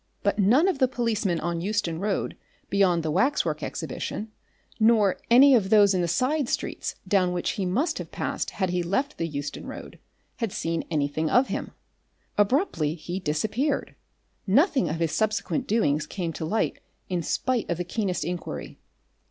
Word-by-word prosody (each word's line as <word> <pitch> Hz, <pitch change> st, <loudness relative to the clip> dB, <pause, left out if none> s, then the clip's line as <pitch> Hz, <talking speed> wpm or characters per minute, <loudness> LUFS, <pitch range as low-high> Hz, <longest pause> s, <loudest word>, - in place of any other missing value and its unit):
But 200 Hz, +1 st, +1 dB
none 245 Hz, -, +5 dB
of 370 Hz, -8 st, 0 dB
the 260 Hz, -, +5 dB
policemen 225 Hz, -8 st, 0 dB
on 170 Hz, 0 st, -2 dB
Euston 195 Hz, -4 st, -1 dB
Road 200 Hz, +1 st, -1 dB, 0.4 s
beyond 185 Hz, -4 st, +3 dB
the 155 Hz, -, -1 dB
Waxwork 275 Hz, -, +1 dB
Exhibition, 215 Hz, +1 st, -4 dB, 0.5 s
nor 215 Hz, -3 st, +4 dB
any 265 Hz, +4 st, +8 dB
of 210 Hz, -6 st, +3 dB
those 205 Hz, -2 st, +6 dB
in 185 Hz, -, +1 dB
the 175 Hz, -, 0 dB
side 255 Hz, -, +1 dB
streets -, -, -3 dB
down 185 Hz, -3 st, +2 dB
which 175 Hz, -, -1 dB
he 190 Hz, -3 st, -2 dB
must 260 Hz, -, 0 dB
have -, -, -6 dB
passed -, -, -2 dB
had 190 Hz, -3 st, -2 dB
he 180 Hz, 0 st, 0 dB
left 265 Hz, -, -1 dB
the 165 Hz, -, 0 dB
Euston 145 Hz, -2 st, -5 dB
Road, -, -, -9 dB, 0.4 s
had 230 Hz, -5 st, -2 dB
seen 165 Hz, -2 st, -2 dB
anything 155 Hz, 0 st, 0 dB
of 250 Hz, -, +3 dB
him. -, -, -4 dB, 0.6 s
Abruptly 205 Hz, -, +1 dB
he 175 Hz, +3 st, -5 dB
disappeared. 220 Hz, -, -1 dB, 0.5 s
Nothing 260 Hz, -, +3 dB
of 155 Hz, -, -1 dB
his 165 Hz, -1 st, -1 dB
subsequent 215 Hz, -, -1 dB
doings 150 Hz, -9 st, +1 dB
came 170 Hz, -3 st, -3 dB
to 160 Hz, -, -4 dB
light 215 Hz, +7 st, 0 dB, 0.3 s
in 180 Hz, -2 st, -1 dB
spite 250 Hz, +8 st, -1 dB
of 170 Hz, -, 0 dB
the 180 Hz, -, -2 dB
keenest 185 Hz, 0 st, -2 dB
inquiry. 175 Hz, 0 st, -5 dB
195 Hz, 170 wpm, -26 LUFS, 170-235 Hz, 0.6 s, any